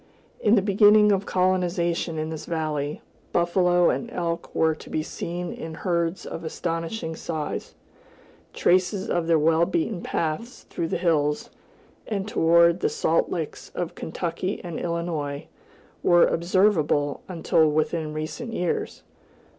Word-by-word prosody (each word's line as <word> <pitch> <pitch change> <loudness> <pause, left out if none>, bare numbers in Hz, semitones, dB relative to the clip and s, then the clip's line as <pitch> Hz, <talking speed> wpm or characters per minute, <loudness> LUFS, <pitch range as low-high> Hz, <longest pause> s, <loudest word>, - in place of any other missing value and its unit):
In 210 +2 +4
the 200 - +3
beginning 210 +1 +6
of 195 0 0
colonization 180 -3 0
in 155 +1 -3
this 160 - -7
valley, 155 -3 -2 0.3
buffalo 175 0 +3
and 235 - -3
elk 170 -1 -3
were 160 0 +3
to - - -12
be 155 - -1
seen 175 +2 -5
in 160 0 -7
herds 170 0 -1
of 165 - -6
astonishing 165 +2 -3
size; 155 -2 -4 0.8
traces 185 +2 +1
of 175 -1 0
their 165 -1 +4
well 160 +2 +3
beaten 230 - -1
paths 170 +10 -3
through 165 - -2
the - - -1
hills, 150 -4 0 0.6
and 200 -2 -2
toward 170 -2 +4
the - - +1
salt 165 - +1
licks 160 -4 -5
of 175 -2 -3
Kentucky 175 +3 -3
and 170 -3 -5
Illinois, 165 -4 -3 0.6
were 175 -1 +6
observable 165 -5 +2
until 160 -2 +2
within 155 +1 0
recent 155 +10 -5
years. 180 -5 -2
170 Hz, 135 wpm, -25 LUFS, 160-185 Hz, 0.8 s, beginning